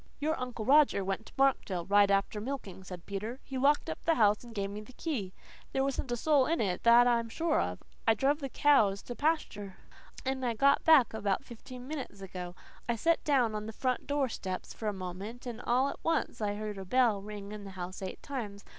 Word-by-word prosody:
"Your 310 Hz, +2 st, 0 dB
Uncle 245 Hz, -3 st, -4 dB
Roger 275 Hz, -8 st, +5 dB
went 195 Hz, +3 st, -3 dB
to -, -, -15 dB
Markdale 230 Hz, -10 st, +1 dB
right 200 Hz, 0 st, +5 dB
after 200 Hz, +1 st, +1 dB
milking," 220 Hz, -7 st, -6 dB
said 180 Hz, -2 st, -9 dB
Peter. 215 Hz, +6 st, -5 dB
"He 270 Hz, -, -8 dB
locked 285 Hz, +3 st, +3 dB
up 160 Hz, -, -5 dB
the 330 Hz, -, +3 dB
house 210 Hz, -3 st, +3 dB
and 235 Hz, -1 st, -12 dB
gave 200 Hz, -1 st, -2 dB
me 210 Hz, +1 st, -6 dB
the 215 Hz, +4 st, -14 dB
key. 240 Hz, -, -3 dB, 0.4 s
There 270 Hz, -, +2 dB
wasn't 270 Hz, -1 st, -2 dB
a 240 Hz, -, 0 dB
soul 285 Hz, 0 st, +3 dB
in 330 Hz, +1 st, +1 dB
it 185 Hz, -4 st, 0 dB
then, 235 Hz, +1 st, +7 dB
that -, -, +3 dB
I'm 235 Hz, -1 st, +2 dB
sure 325 Hz, +6 st, +1 dB
of. -, -, -4 dB, 0.2 s
I 225 Hz, -, +5 dB
druv 280 Hz, +6 st, +2 dB
the 275 Hz, -3 st, -4 dB
cows 220 Hz, -10 st, +3 dB
to -, -, -24 dB
the 245 Hz, -, -4 dB
pasture, 235 Hz, -, -1 dB, 0.5 s
and 265 Hz, 0 st, -1 dB
I 240 Hz, -2 st, 0 dB
got 280 Hz, +4 st, +4 dB
back 300 Hz, -9 st, +6 dB
about 205 Hz, 0 st, -1 dB
fifteen 250 Hz, +1 st, -10 dB
minutes 275 Hz, -9 st, -6 dB
ago. 180 Hz, -2 st, -7 dB, 0.3 s
I 235 Hz, -, +2 dB
set 330 Hz, +9 st, +1 dB
down 255 Hz, -7 st, +2 dB
on 215 Hz, 0 st, -4 dB
the -, -, -4 dB
front 255 Hz, +2 st, -1 dB
door 285 Hz, -2 st, +1 dB
steps 185 Hz, -5 st, -5 dB
for 220 Hz, -, -5 dB
a -, -, +2 dB
moment, 195 Hz, +6 st, -7 dB
and 240 Hz, -1 st, -6 dB
all 250 Hz, +3 st, +2 dB
at -, -, -8 dB
once 330 Hz, -7 st, 0 dB
I 205 Hz, -1 st, 0 dB
heard 210 Hz, -1 st, -5 dB
a 190 Hz, -, -7 dB
bell 230 Hz, -1 st, +3 dB
ring 205 Hz, 0 st, -8 dB
in 210 Hz, -1 st, -7 dB
the 200 Hz, -, -8 dB
house 180 Hz, +2 st, -6 dB
eight 190 Hz, -, -6 dB
times. 220 Hz, -7 st, -6 dB
230 Hz, 230 wpm, -31 LUFS, 200-270 Hz, 0.5 s, then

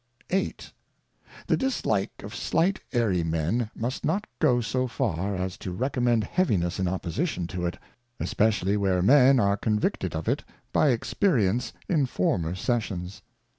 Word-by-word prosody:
VIII. 190 Hz, +1 st, +1 dB, 0.9 s
The -, -, +2 dB
dislike 110 Hz, -, -1 dB
of -, -, -7 dB
slight 175 Hz, +5 st, +1 dB
Airy 105 Hz, -8 st, +1 dB
Men 80 Hz, +8 st, 0 dB
must 120 Hz, +4 st, -3 dB
not 205 Hz, +2 st, 0 dB
go 130 Hz, -6 st, +4 dB
so 130 Hz, +2 st, -1 dB
far, 100 Hz, -4 st, -1 dB
as 95 Hz, 0 st, -3 dB
to 95 Hz, -, -5 dB
recommend 120 Hz, +1 st, +1 dB
heaviness 100 Hz, -, 0 dB
in 95 Hz, -, +1 dB
opposition 90 Hz, -, -2 dB
to 90 Hz, 0 st, -3 dB
it, 85 Hz, -, -4 dB, 0.4 s
especially 105 Hz, -2 st, +1 dB
where 95 Hz, -3 st, +1 dB
men 135 Hz, +3 st, +6 dB
are 100 Hz, -1 st, +2 dB
convicted 105 Hz, -1 st, -1 dB
of -, -, -4 dB
it -, -, 0 dB, 0.3 s
by 150 Hz, -, +4 dB
Experience 120 Hz, -, +1 dB, 0.2 s
in 150 Hz, -7 st, +2 dB
former 90 Hz, -5 st, 0 dB
Sessions. 95 Hz, -4 st, -2 dB
110 Hz, 140 wpm, -26 LUFS, 90-130 Hz, 0.9 s, men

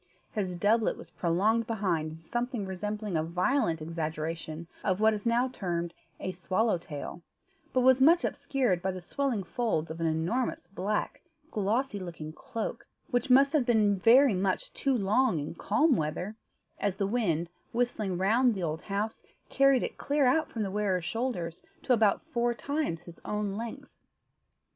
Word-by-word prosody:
His 190 Hz, -5 st, -2 dB
doublet 215 Hz, +5 st, +2 dB
was -, -, -12 dB
prolonged 210 Hz, +7 st, +1 dB
behind 185 Hz, -8 st, 0 dB
into 160 Hz, +1 st, -11 dB
something 240 Hz, +3 st, -2 dB
resembling 210 Hz, +1 st, -3 dB
a 155 Hz, -, +2 dB
violent 180 Hz, -, +1 dB
exaggeration 160 Hz, 0 st, -4 dB, 0.2 s
of 190 Hz, -1 st, +1 dB
what 220 Hz, 0 st, +5 dB
is 210 Hz, +2 st, -3 dB
now 240 Hz, +2 st, +3 dB
termed 175 Hz, -7 st, -3 dB, 0.3 s
a 185 Hz, -, -3 dB
"swallow 185 Hz, +3 st, 0 dB
tail," 165 Hz, +1 st, -7 dB, 0.5 s
but 255 Hz, -, +2 dB
was 260 Hz, +1 st, +5 dB
much 335 Hz, +5 st, +6 dB
obscured 250 Hz, -, 0 dB
by 190 Hz, -, -1 dB
the 185 Hz, 0 st, -3 dB
swelling 240 Hz, +3 st, -1 dB
folds 180 Hz, -8 st, -1 dB
of 165 Hz, +1 st, -6 dB
an 165 Hz, -, +2 dB
enormous 170 Hz, +12 st, -1 dB
black, 195 Hz, +3 st, -2 dB, 0.3 s
glossy 215 Hz, +2 st, 0 dB
looking 165 Hz, -4 st, -7 dB
cloak, 225 Hz, +6 st, -5 dB, 0.2 s
which 245 Hz, +2 st, 0 dB
must 275 Hz, +3 st, +6 dB
have 300 Hz, -4 st, +4 dB
been 215 Hz, -4 st, +4 dB
very 250 Hz, +5 st, +6 dB
much 200 Hz, -, -1 dB
too 270 Hz, -2 st, +1 dB
long 215 Hz, 0 st, +2 dB
in 150 Hz, +1 st, -4 dB
calm 250 Hz, -, +2 dB
weather, 170 Hz, +6 st, -2 dB, 0.4 s
as 200 Hz, -2 st, 0 dB
the 195 Hz, -, 0 dB
wind, 175 Hz, -7 st, 0 dB, 0.2 s
whistling 230 Hz, -6 st, -1 dB
round 225 Hz, +6 st, +3 dB
the 190 Hz, -, -3 dB
old 160 Hz, -1 st, -2 dB
house, 210 Hz, +2 st, -3 dB, 0.3 s
carried 275 Hz, -2 st, +4 dB
it -, -, -5 dB
clear 285 Hz, -1 st, +2 dB
out 310 Hz, +5 st, +3 dB
from 225 Hz, -, -2 dB
the 195 Hz, -, -3 dB
wearer's 195 Hz, -4 st, 0 dB
shoulders 225 Hz, -8 st, -3 dB, 0.2 s
to 255 Hz, -, +3 dB
about 220 Hz, -4 st, +3 dB
four 240 Hz, 0 st, 0 dB
times 280 Hz, -, -2 dB
his 170 Hz, -1 st, -12 dB
own 210 Hz, -2 st, -2 dB
length. 235 Hz, +6 st, -6 dB
210 Hz, 165 wpm, -29 LUFS, 175-245 Hz, 0.5 s, much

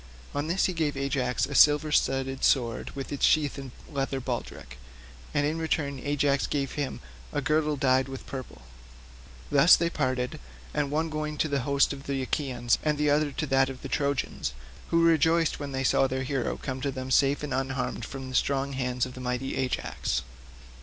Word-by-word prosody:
'" 65 Hz, -, -20 dB
On 145 Hz, +2 st, -2 dB
this 180 Hz, +4 st, +2 dB
he 185 Hz, -, 0 dB
gave 155 Hz, -4 st, -1 dB
Ajax 135 Hz, -2 st, 0 dB
a -, -, -7 dB
silver 150 Hz, +1 st, +5 dB
studded 135 Hz, -2 st, +1 dB
sword 120 Hz, -4 st, +2 dB
with 135 Hz, -1 st, -6 dB
its 140 Hz, -, -4 dB
sheath 145 Hz, -3 st, +3 dB
and 135 Hz, -1 st, -7 dB, 0.2 s
leathern 135 Hz, -2 st, -2 dB
baldric, 120 Hz, -, -5 dB, 0.5 s
and 145 Hz, -1 st, +1 dB
in 155 Hz, +2 st, -1 dB
return 145 Hz, -4 st, -1 dB
Ajax 145 Hz, 0 st, +1 dB
gave 140 Hz, -2 st, -1 dB
him 145 Hz, -2 st, -3 dB, 0.3 s
a 145 Hz, -, -1 dB
girdle 150 Hz, +1 st, +1 dB
dyed 130 Hz, -1 st, +2 dB
with 135 Hz, -1 st, -8 dB
purple. 130 Hz, -, -8 dB, 0.9 s
Thus 145 Hz, +4 st, +8 dB
they 170 Hz, 0 st, 0 dB
parted, 130 Hz, -4 st, -1 dB, 0.3 s
the 145 Hz, -1 st, 0 dB
one 155 Hz, +3 st, -1 dB
going 155 Hz, 0 st, -3 dB
to 155 Hz, -, +1 dB
the 140 Hz, -2 st, 0 dB
host 140 Hz, 0 st, +3 dB
of 135 Hz, 0 st, -10 dB
the 135 Hz, -1 st, -1 dB
Achaeans, 125 Hz, -4 st, 0 dB
and 150 Hz, -1 st, 0 dB
the 150 Hz, 0 st, +2 dB
other 150 Hz, 0 st, +2 dB
to 155 Hz, -, -2 dB
that 135 Hz, -1 st, +3 dB
of 130 Hz, -1 st, -9 dB
the -, -, -5 dB
Trojans, 140 Hz, -, -1 dB, 0.3 s
who 165 Hz, 0 st, +3 dB
rejoiced 165 Hz, 0 st, +3 dB
when 145 Hz, -1 st, -5 dB
they 135 Hz, 0 st, -2 dB
saw 135 Hz, +1 st, +3 dB
their 130 Hz, 0 st, -2 dB
hero 130 Hz, -1 st, -2 dB
come 130 Hz, -1 st, -5 dB
to 140 Hz, -, 0 dB
them 130 Hz, -1 st, -5 dB
safe 140 Hz, +2 st, +3 dB
and 150 Hz, -, -3 dB
unharmed 135 Hz, 0 st, -2 dB
from 135 Hz, -1 st, -6 dB
the 130 Hz, -, -8 dB
strong 140 Hz, +1 st, +1 dB
hands 125 Hz, -1 st, -1 dB
of 125 Hz, -, -9 dB
mighty 125 Hz, +1 st, -3 dB
Ajax. 125 Hz, -, -1 dB
140 Hz, 195 wpm, -27 LUFS, 130-150 Hz, 0.9 s, Thus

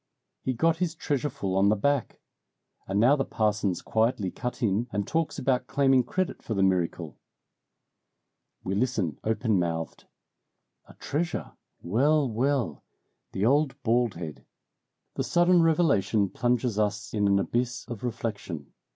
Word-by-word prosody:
He 130 Hz, -, -1 dB
got 165 Hz, +6 st, +2 dB
his 175 Hz, -2 st, -1 dB
treasure 145 Hz, -2 st, -1 dB
full 100 Hz, -9 st, -3 dB
on 100 Hz, +1 st, +4 dB
the 105 Hz, -, +4 dB
back. 140 Hz, +4 st, 0 dB, 0.7 s
And 95 Hz, +1 st, 0 dB
now 125 Hz, +6 st, +6 dB
the 135 Hz, -, 0 dB
parson's 105 Hz, -6 st, -1 dB
quietly 110 Hz, -4 st, 0 dB
cut 125 Hz, +1 st, -5 dB
in 110 Hz, +3 st, +1 dB
and 100 Hz, -1 st, -1 dB
talks 160 Hz, 0 st, -1 dB
about 125 Hz, -1 st, 0 dB
claiming 135 Hz, +1 st, +3 dB
credit 185 Hz, +9 st, -2 dB
for 110 Hz, -, -4 dB
the 95 Hz, -, +2 dB
miracle." 85 Hz, -5 st, 0 dB, 1.4 s
We 95 Hz, -, -2 dB
listen 100 Hz, -, -1 dB
open 110 Hz, -2 st, +1 dB
mouthed. 80 Hz, -5 st, -3 dB, 0.8 s
"A -, -, -15 dB
treasure 160 Hz, +3 st, -3 dB, 0.3 s
well! 140 Hz, -, +2 dB
well! 120 Hz, -, -1 dB, 0.5 s
The 95 Hz, +2 st, 0 dB
old 140 Hz, +2 st, +2 dB
bald 120 Hz, -1 st, +2 dB
head!" 80 Hz, -4 st, -7 dB, 0.7 s
The -, -, -2 dB
sudden 175 Hz, 0 st, +4 dB
revelation 115 Hz, -, +2 dB
plunges 120 Hz, -3 st, 0 dB
us 105 Hz, 0 st, -1 dB
in 105 Hz, -2 st, +2 dB
an 100 Hz, 0 st, +4 dB
abyss 120 Hz, +4 st, -1 dB
of 120 Hz, -1 st, -7 dB
reflection. 110 Hz, -, -5 dB
115 Hz, 140 wpm, -27 LUFS, 100-140 Hz, 1.4 s, now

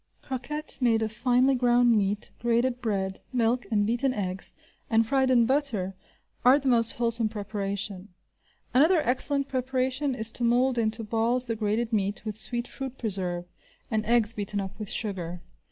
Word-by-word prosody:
Croquettes 285 Hz, +3 st, -4 dB
made 225 Hz, -3 st, +3 dB
of 220 Hz, -, -2 dB
finely 250 Hz, +3 st, +2 dB
ground 245 Hz, -1 st, +4 dB
meat, 205 Hz, 0 st, -1 dB
grated 240 Hz, +2 st, +1 dB
bread, 190 Hz, -4 st, -2 dB
milk, 245 Hz, 0 st, +1 dB
and 205 Hz, -2 st, +2 dB
beaten 250 Hz, +4 st, 0 dB
eggs, 190 Hz, -2 st, -4 dB, 0.4 s
and 225 Hz, 0 st, +3 dB
fried 265 Hz, +2 st, +2 dB
in 240 Hz, -2 st, +5 dB
butter, 235 Hz, -8 st, 0 dB, 0.5 s
are 255 Hz, +3 st, +7 dB
the 275 Hz, -2 st, -4 dB
most 230 Hz, -3 st, +4 dB
wholesome 230 Hz, -1 st, +1 dB
preparation. 200 Hz, -2 st, -4 dB, 0.6 s
Another 315 Hz, +8 st, +5 dB
excellent 275 Hz, +3 st, 0 dB
preparation 260 Hz, +1 st, -1 dB
is 220 Hz, -1 st, -1 dB
to 240 Hz, -, -5 dB
mould 245 Hz, +1 st, +2 dB
into 220 Hz, 0 st, 0 dB
balls 230 Hz, +3 st, +2 dB
the 230 Hz, -2 st, -2 dB
grated 220 Hz, +2 st, -1 dB
meat, 200 Hz, 0 st, -1 dB
with 215 Hz, -2 st, -4 dB
sweet 240 Hz, +2 st, +1 dB
fruit 265 Hz, -1 st, -7 dB
preserve, 185 Hz, -5 st, -2 dB, 0.5 s
and 215 Hz, -1 st, +1 dB
eggs 230 Hz, -2 st, +3 dB
beaten 205 Hz, -1 st, -3 dB
up 190 Hz, -1 st, -4 dB
with 210 Hz, -2 st, -5 dB
sugar. 180 Hz, -5 st, -3 dB
230 Hz, 160 wpm, -27 LUFS, 210-255 Hz, 0.6 s, are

